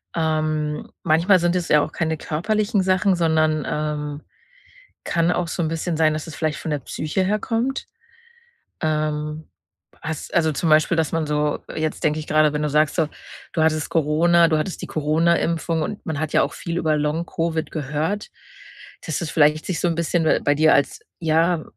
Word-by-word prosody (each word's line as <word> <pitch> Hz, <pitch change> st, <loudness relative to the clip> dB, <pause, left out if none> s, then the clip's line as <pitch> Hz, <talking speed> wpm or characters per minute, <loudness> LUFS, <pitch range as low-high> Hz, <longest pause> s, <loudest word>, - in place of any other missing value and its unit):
Ähm, 155 Hz, -2 st, -1 dB
manchmal 170 Hz, +4 st, +4 dB
sind 175 Hz, 0 st, +1 dB
es 175 Hz, -, -3 dB
ja 150 Hz, -1 st, +5 dB
auch 155 Hz, -, -3 dB
keine 160 Hz, -1 st, -1 dB
körperlichen 210 Hz, +7 st, 0 dB
Sachen, 185 Hz, +1 st, +2 dB
sondern, 155 Hz, -2 st, +2 dB
ähm, 150 Hz, -1 st, -3 dB, 0.8 s
kann 170 Hz, 0 st, +1 dB
auch 180 Hz, -1 st, 0 dB
so 170 Hz, -, -2 dB
'n 160 Hz, -, 0 dB
bisschen 165 Hz, +1 st, -2 dB
sein, 155 Hz, -1 st, +3 dB
dass 155 Hz, +1 st, -5 dB
es 160 Hz, -, -8 dB
vielleicht 155 Hz, 0 st, -2 dB
von 160 Hz, -, -5 dB
der 145 Hz, -, -1 dB
Psyche 155 Hz, +8 st, -2 dB
herkommt. 225 Hz, +6 st, -1 dB, 0.9 s
Ähm, 155 Hz, -1 st, -2 dB, 0.6 s
hast 160 Hz, -1 st, -5 dB
also, 160 Hz, -2 st, +3 dB
zum 160 Hz, +3 st, -1 dB
Beispiel, 155 Hz, +3 st, +4 dB
dass 160 Hz, -2 st, 0 dB
man 160 Hz, -1 st, 0 dB
so 150 Hz, 0 st, 0 dB, 0.2 s
jetzt 155 Hz, 0 st, -2 dB
denke 150 Hz, 0 st, +2 dB
ich 155 Hz, -, -9 dB
grade, 155 Hz, -1 st, +3 dB
wenn 150 Hz, -, -1 dB
du 150 Hz, -, 0 dB
sagst 150 Hz, +1 st, +2 dB
so, 160 Hz, -4 st, +1 dB, 0.4 s
du 160 Hz, -, 0 dB
hattest 155 Hz, -1 st, +1 dB
Corona, 165 Hz, +2 st, +3 dB
du 155 Hz, -, +2 dB
hattest 170 Hz, +4 st, -3 dB
die -, -, -4 dB
Corona-Impfung 165 Hz, +1 st, +1 dB
und 205 Hz, +6 st, -5 dB
man 160 Hz, -3 st, -2 dB
hat 155 Hz, -1 st, -3 dB
ja -, -, +4 dB
auch -, -, -2 dB
viel 170 Hz, 0 st, -4 dB
über 155 Hz, -2 st, +1 dB
Long-Covid 160 Hz, +1 st, -2 dB
gehört, 155 Hz, +7 st, -2 dB, 0.8 s
dass 160 Hz, -, -2 dB
das 170 Hz, -, -3 dB
vielleicht 155 Hz, 0 st, +3 dB
sich 185 Hz, -, -2 dB
so 175 Hz, -, +1 dB
'n 170 Hz, -, 0 dB
bisschen 170 Hz, 0 st, 0 dB
b -, -, +3 dB
bei 145 Hz, -, +2 dB
dir 155 Hz, +2 st, +4 dB
als, 140 Hz, -, +1 dB, 0.2 s
ja, 165 Hz, 0 st, +2 dB
160 Hz, 185 wpm, -22 LUFS, 150-170 Hz, 0.9 s, ja